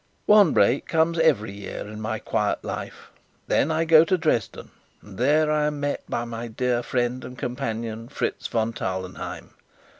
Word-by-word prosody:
One 205 -6 +6
break 120 +7 +3
comes 165 +1 +1
every 135 -11 +3
year 100 -1 -7
in 105 +1 -7
my 110 0 -2
quiet 105 -1 -1
life. - - -7 0.3
Then 145 - +2
I 160 +1 +1
go 160 -1 +7
to 185 +2 +2
Dresden, 155 - -1 0.3
and 100 -1 -12
there 150 +4 +3
I 150 -1 +2
am 150 -1 -3
met 145 0 -2
by 120 - -2
my 115 0 -5
dear 120 +1 0
friend 125 +1 -1
and 125 - -9
companion, 115 -3 -4
Fritz - - -3
von 115 0 -1
Tarlenheim. 95 -2 -5
120 Hz, 170 wpm, -24 LUFS, 110-155 Hz, 0.3 s, go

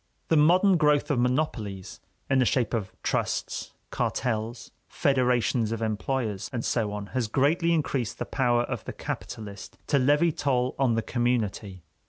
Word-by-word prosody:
The 160 - +4
modern 180 +5 +5
growth 150 -1 +3
of 135 - +1
monopolies 120 -7 -2 0.3
in 135 - +2
the 130 - +4
shape 125 0 +1
of 100 -5 -2
trusts, - - -2 0.2
cartels, 115 0 -2 0.2
federations 125 -4 +1
of 115 - -2
employers 110 0 -2
and 120 -2 -3
so 110 -4 0
on 105 0 -5
has 125 -3 0
greatly 150 +8 +2
increased 140 -7 -1
the - - -3
power 120 -3 +1
of - - -4
the - - -5
capitalist 105 -2 -7
to 140 - +2
levy 145 +6 +3
toll 130 -4 0
on 125 -4 +3
the 115 - 0
community. 110 -7 -1
125 Hz, 155 wpm, -27 LUFS, 110-140 Hz, 0.3 s, modern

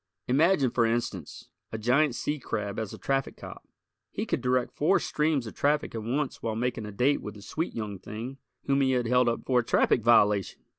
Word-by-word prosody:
Imagine, 140 0 +3
for 120 - +2
instance, 115 -8 -2 0.2
a 110 - -3
giant 125 +5 +2
sea 150 +4 -2
crab 105 -4 -3
as 110 -3 -4
a - - -8
traffic 135 -1 -1
cop! - - -10 0.4
He - - -4
could - - -1
direct 125 -1 +1
four 165 +8 +3
streams 150 -4 0
of 110 - -7
traffic 145 +1 0
at 115 - -4
once 130 +6 -2
while 110 -1 -2
making 115 -2 -2
a - - -7
date 125 +8 +1
with 105 -1 -7
the 100 - -12
sweet 165 - -4
young 105 -4 -4
thing 115 +8 -7 0.3
whom 140 0 +2
he 130 -1 +2
had 125 -1 +1
held 125 +1 +3
up 115 - -3
for 125 -2 +3
a - - 0
traffic 115 - +2
violation! 105 -4 +3
125 Hz, 210 wpm, -28 LUFS, 110-135 Hz, 0.4 s, Imagine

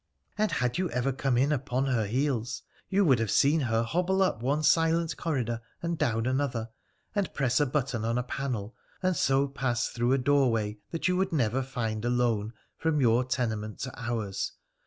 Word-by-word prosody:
' - - -42
And 215 -3 +2
had 125 +3 0
you 185 -2 0
ever 125 +2 0
come 135 -1 0
in 140 +4 +3
upon 135 -2 0
her 125 -5 +1
heels 125 0 -1 0.3
you 200 0 +3
would 130 -7 +4
have 115 -2 -1
seen 145 +9 +4
her 115 -4 +1
hobble 180 +9 +1
up 150 -12 0
one 145 +5 0
silent 165 +2 +3
corridor 120 -8 -2 0.2
and 170 0 0
down 115 -8 0
another, 130 -3 -1 0.4
and 200 -5 -1
press 125 -3 +2
a 145 - +3
button 130 -4 -1
on 115 +1 0
a 125 - 0
panel, 120 -5 -4 0.3
and 185 -1 +2
so 135 -1 +2
pass 130 -3 -1
through 120 +2 +1
a - - +4
doorway 125 -6 +2
that 165 +2 -1
you 185 - +2
would 190 0 +1
never 130 -4 +1
find 115 -5 -3
alone, 120 -3 +1 0.3
from 160 -2 +1
your 120 -1 +4
tenement 110 -4 -2
to 130 0 -4
ours. 115 -5 -3
130 Hz, 190 wpm, -28 LUFS, 115-145 Hz, 0.4 s, would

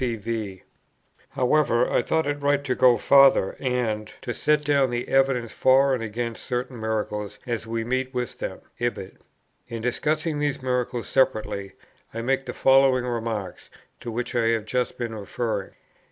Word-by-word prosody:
cv. 110 -5 -3 0.7
However, 125 -2 +2
I - - +2
thought 160 +6 0
it 145 0 -2
right 145 0 +2
to 130 -3 0
go 125 -2 +5
farther 135 -8 +5
and 115 -5 -1
"to 120 - -3
set 150 +3 +1
down 140 -2 +3
the 120 0 -3
evidence 135 -4 +2
for 135 +1 +4
and 125 - -1
against 115 +1 -4
certain 125 -1 -3
miracles 105 -2 -3
as 115 -2 -3
we 115 0 -2
meet 130 +2 -1
with 125 -2 -4
them," - - -5 0.2
ibid. 120 -6 -3 0.5
In 115 -2 -6
discussing 155 +5 -1
these 145 -1 -1
miracles 125 -2 -2
separately, 110 -6 0 0.4
I 115 - -3
make 135 +2 0
the - - -2
following 135 -1 +4
remarks, 115 -6 -4 0.3
to 120 - -7
which 120 +2 -3
I 120 -2 +1
have 115 -2 +1
just 125 +2 -1
been 120 -2 -4
referring. 105 -1 -3
120 Hz, 160 wpm, -25 LUFS, 115-135 Hz, 0.7 s, go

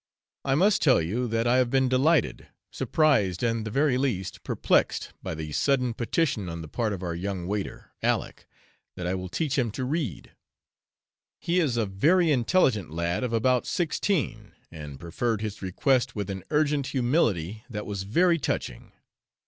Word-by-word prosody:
I 135 - +1
must 200 +7 +3
tell 130 - +5
you 105 +10 -1
that 115 0 0
I 120 +1 +4
have 125 -2 +3
been 130 +1 +2
delighted, 140 +6 +2 0.2
surprised, 115 - +1
and 115 -2 0
the - - -2
very 135 +2 +2
least 105 -9 -2
perplexed, - - +1
by - - -4
the 75 -1 -6
sudden 125 - +1
petition 115 - -1
on 85 0 -6
the - - -8
part 110 +6 -1
of 95 -2 -5
our 85 -2 -2
young 90 +1 -4
waiter, 100 +1 -4
Aleck, - - -1 0.5
that 90 - -5
I 90 - 0
will 95 -1 -4
teach 150 - -1
him 120 -3 +1
to 130 - -3
read. 140 - -3 1.1
He 175 +1 0
is 140 -9 +1
a 115 - +2
very 155 - +3
intelligent 120 - +2
lad 85 +6 -2
of 125 - -1
about 125 +2 +2
sixteen, 175 0 -1 0.2
and 75 -4 -9
preferred 105 +7 -2
his 105 -2 -5
request 125 +7 +1
with 100 -2 -3
an 95 -1 -6
urgent 150 -2 +1
humility 115 - 0
that 105 -3 -5
was 100 -2 -4
very 170 - +2
touching. 60 - -4
115 Hz, 170 wpm, -26 LUFS, 95-140 Hz, 1.1 s, tell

